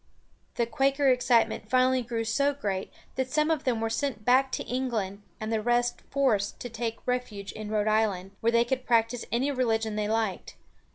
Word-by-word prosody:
The 235 - +1
Quaker 270 +4 +2
excitement 245 -3 +2
finally 255 +1 +3
grew 230 -1 -3
so 280 +5 +1
great 195 -8 -3 0.3
that 260 -1 -1
some 305 +1 +2
of 315 -4 -1
them 245 -4 +1
were 225 0 -1
sent 230 -3 -2
back 260 +2 +4
to - - -1
England 225 -6 -2 0.2
and 215 +1 -3
the 220 - +1
rest 240 +1 +1
forced 235 -8 +1
to 245 - -5
take 230 0 -4
refuge 250 -6 -3
in 215 -1 -7
Rhode 210 -1 0
Island, 210 -4 +1
where 230 - +3
they 235 0 +4
could 255 +1 -2
practice 230 0 +2
any 260 +5 +1
religion 225 -5 0
they 210 -1 -1
liked. 220 -3 -2
235 Hz, 185 wpm, -28 LUFS, 220-255 Hz, 0.3 s, back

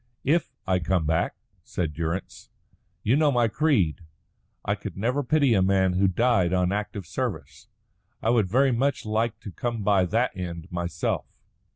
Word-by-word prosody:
"If 165 +5 +1
I 95 -1 +2
come 85 -1 0
back," 80 +3 0 0.3
said 80 -4 -3
Durrance. 85 +4 -4 0.5
"You 115 - +3
know 150 0 +4
my 120 -3 +3
creed. 110 - +1 0.6
I - - +1
could - - -7
never 125 +8 0
pity 140 -1 +3
a 95 - +3
man 95 -1 +3
who 95 +2 +3
died 95 -3 +2
on 90 0 +2
active 105 -2 -3
service. 85 - -5 0.5
I 115 - +1
would 110 -6 +2
very 130 +5 +3
much 135 +3 0
like 110 +1 -1
to 100 - -8
come 115 +1 -3
by 100 -2 +3
that 115 +7 0
end 85 -3 -6
myself." 85 -1 -2
100 Hz, 165 wpm, -26 LUFS, 90-120 Hz, 0.6 s, know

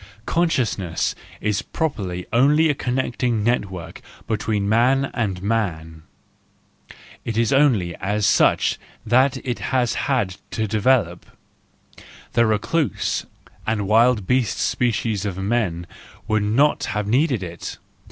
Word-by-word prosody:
Consciousness 120 - 0 0.3
is 105 0 0
properly 100 - -3
only 150 +6 +4
a - - +3
connecting 125 -4 -1
net¬ 120 -2 +2
work 90 -3 -9 0.2
between 105 -2 -1
man 130 +5 +2
and 95 -6 -2
man,—It 90 +2 -6
is 115 +1 +2
only 120 -12 +3
as 105 +2 -1
such - - +3 0.3
that 130 +4 +3
it 120 -3 -2
has 125 -3 0 0.2
had 105 -9 0
to 110 -1 -2
develop; 105 -4 +1 1.1
the 115 0 +3
recluse 130 +8 -1 0.4
and 105 -3 0
wild 115 0 +4
beast 125 +1 +1
species 115 -4 0
of 100 -3 -3
men 95 -4 -1 0.4
would 110 -1 +1
not 115 +9 +2
have 105 -1 -2
needed 125 - +1
it. 85 -1 -7
110 Hz, 115 wpm, -22 LUFS, 100-125 Hz, 1.1 s, only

